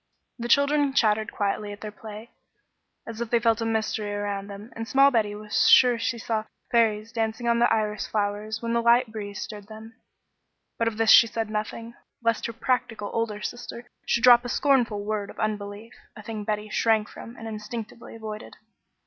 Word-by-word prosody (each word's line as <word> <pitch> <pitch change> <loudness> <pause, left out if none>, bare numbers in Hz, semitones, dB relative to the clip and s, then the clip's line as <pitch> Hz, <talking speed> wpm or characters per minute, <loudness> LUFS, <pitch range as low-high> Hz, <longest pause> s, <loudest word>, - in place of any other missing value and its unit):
The 235 - -3
children 280 +2 +3
chattered 215 -3 +2
quietly 205 +1 -2
at 205 - -10
their 215 - -6
play, 215 +2 -10 0.7
as 230 0 -7
if 235 - -3
they 235 - +3
felt 230 0 +2
a 225 - -1
mystery 220 -2 -1
around 205 -1 -3
them, 205 +3 -10
and 225 0 -5
small 275 +2 +5
Betty 215 -4 +1
was 210 0 +1
sure 245 -2 +6
she 230 +1 -1
saw 220 -1 -2 0.3
fairies 225 -2 +2
dancing 225 0 -2
on 235 0 +3
the 240 - +3
iris 210 -1 0
flowers 210 +1 -2
when 230 0 -1
the 235 - +2
light 235 0 +4
breeze 205 -2 -6
stirred 205 -2 -9
them; 220 +1 -11 0.9
but 230 - +2
of 225 -2 -2
this 225 -1 +4
she 230 - +9
said 225 -1 -3
nothing, 220 +2 -4 0.3
lest 230 -1 +1
her 230 - -6
practical 240 -4 -2
older 220 -2 -2
sister 240 0 -6 0.2
should 235 - +1
drop 245 -1 +8
a 245 - -5
scornful 235 -7 +1
word 210 -1 -2
of - - -12
unbelief, 210 0 -4 0.2
a 215 - -11
thing 215 -1 -5
Betty 210 0 -2
shrank 220 0 +2
from 230 - -11
and 225 - -8
instinctively 220 +1 -7
avoided. 215 -1 -8
220 Hz, 190 wpm, -26 LUFS, 210-235 Hz, 0.9 s, she